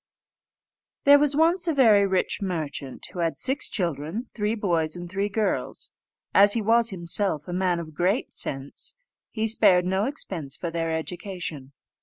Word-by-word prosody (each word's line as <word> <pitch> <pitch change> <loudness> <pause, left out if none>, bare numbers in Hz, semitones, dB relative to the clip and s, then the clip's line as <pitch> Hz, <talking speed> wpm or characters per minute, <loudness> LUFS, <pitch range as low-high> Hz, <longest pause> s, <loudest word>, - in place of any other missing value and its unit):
There 285 0 +8
was 290 -1 +2
once 340 +3 +2
a 325 - +1
very 215 -7 +5
rich 190 +1 0
merchant, 155 -8 -4
who 180 - -6
had 165 -1 0
six 265 +2 -2
children, 175 - -3
three 210 0 -1
boys 170 -7 0
and 175 0 -7
three 195 +3 -2
girls. 210 +1 -2 0.4
As 205 +1 +6
he 230 - 0
was 230 +2 +3
himself 170 -3 -1
a 175 - -5
man 180 -1 +1
of 160 -2 -8
great 185 - 0
sense, 135 +1 -4 0.3
he 220 0 -1
spared 180 -5 +5
no 190 +3 +1
expense 180 - -4
for 170 - -4
their 165 0 -2
education. 160 -4 -5
190 Hz, 160 wpm, -25 LUFS, 165-220 Hz, 0.4 s, There